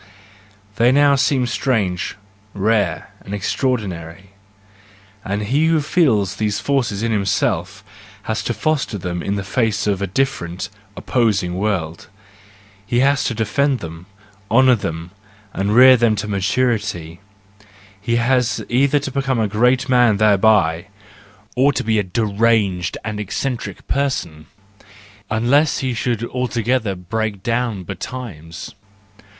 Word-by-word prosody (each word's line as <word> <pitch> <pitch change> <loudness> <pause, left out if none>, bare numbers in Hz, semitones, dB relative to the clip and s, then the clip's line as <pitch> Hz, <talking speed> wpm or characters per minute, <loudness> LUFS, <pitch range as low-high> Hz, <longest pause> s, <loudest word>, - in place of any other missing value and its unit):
They 120 +2 +4
now 145 +1 +5
seem 135 -1 +2
strange, 105 -7 -1 0.4
rare, 100 -4 0
and 100 - -5
extra¬ 100 +6 -3
ordinary: 95 -5 -5 0.9
and 100 +2 -2
he 140 +9 +2
who 165 -1 +3
feels 115 - +1
these 105 -1 -1
forces 120 -7 -1
in 115 - 0
himself 100 -3 -1 0.4
has - - -2
to - - 0
foster 150 -8 -1
them 90 -2 -4
in 100 +3 -2
face 105 +1 0
of 100 -2 0
a 100 - -1
different, 90 -6 -2 0.3
opposing 105 -8 0
world; 90 -4 -2 0.8
he 120 +4 0
has 140 0 +3
to 120 - -1
defend 130 +6 +1
them, 85 -2 -9 0.4
honour 130 +2 +5
them, 85 -6 -4 0.4
and 100 +2 0
rear 130 +1 +9
them 115 -2 +2
to 105 +1 -4
maturity: 100 -5 -1 0.8
and 120 +2 +1
he 120 - -3
either 140 +1 +2
becomes 135 -4 0
a - - 0
great 125 +6 +2
man 120 -5 +4
thereby, 100 -4 +3 0.7
or 135 +3 +4
a 110 -1 +1
deranged 100 -2 0
and 105 -1 -4
eccentric 105 0 -4
person, 110 - -2 0.8
unless 125 +8 +2
he 130 -2 -2
should 115 0 -2
altogether 120 -3 -1
break 100 +2 -3
down 115 -4 -1
betimes. 90 -5 -7
110 Hz, 120 wpm, -19 LUFS, 95-125 Hz, 0.9 s, rear